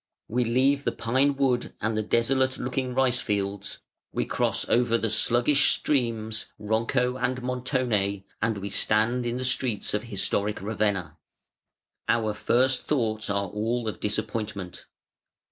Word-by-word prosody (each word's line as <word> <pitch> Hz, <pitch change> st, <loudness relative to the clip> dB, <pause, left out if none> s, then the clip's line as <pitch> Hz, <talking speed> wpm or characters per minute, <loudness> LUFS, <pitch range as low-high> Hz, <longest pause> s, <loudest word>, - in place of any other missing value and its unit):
We 125 Hz, +3 st, +1 dB
leave 135 Hz, +4 st, +2 dB
the -, -, +1 dB
pine 135 Hz, +5 st, +1 dB
wood 130 Hz, -3 st, 0 dB
and 110 Hz, +1 st, -1 dB
the 110 Hz, -, +1 dB
desolate 130 Hz, +4 st, +1 dB
looking 130 Hz, 0 st, -2 dB
rice 130 Hz, -2 st, +3 dB
fields, 100 Hz, -1 st, -2 dB, 0.3 s
we -, -, -1 dB
cross -, -, 0 dB
over 120 Hz, -1 st, +3 dB
the 115 Hz, -2 st, -1 dB
sluggish 120 Hz, +6 st, +3 dB
streams 115 Hz, -5 st, -1 dB
Ronco 115 Hz, +4 st, 0 dB
and 125 Hz, 0 st, -1 dB
Montone 125 Hz, -6 st, -1 dB, 0.2 s
and 110 Hz, -1 st, +1 dB
we 100 Hz, +1 st, -5 dB
stand 120 Hz, +3 st, +2 dB
in 120 Hz, +1 st, -2 dB
the 130 Hz, -, -2 dB
streets 125 Hz, -4 st, 0 dB
of 105 Hz, +2 st, -1 dB
historic 100 Hz, 0 st, 0 dB
Ravenna. 100 Hz, -5 st, -1 dB, 0.9 s
Our 110 Hz, -2 st, +2 dB
first 130 Hz, +4 st, +1 dB
thoughts 110 Hz, -7 st, 0 dB
are 100 Hz, -1 st, 0 dB
all 115 Hz, +4 st, -1 dB
of 110 Hz, -, -3 dB
disappointment. 105 Hz, -3 st, -3 dB
115 Hz, 140 wpm, -26 LUFS, 105-125 Hz, 0.9 s, rice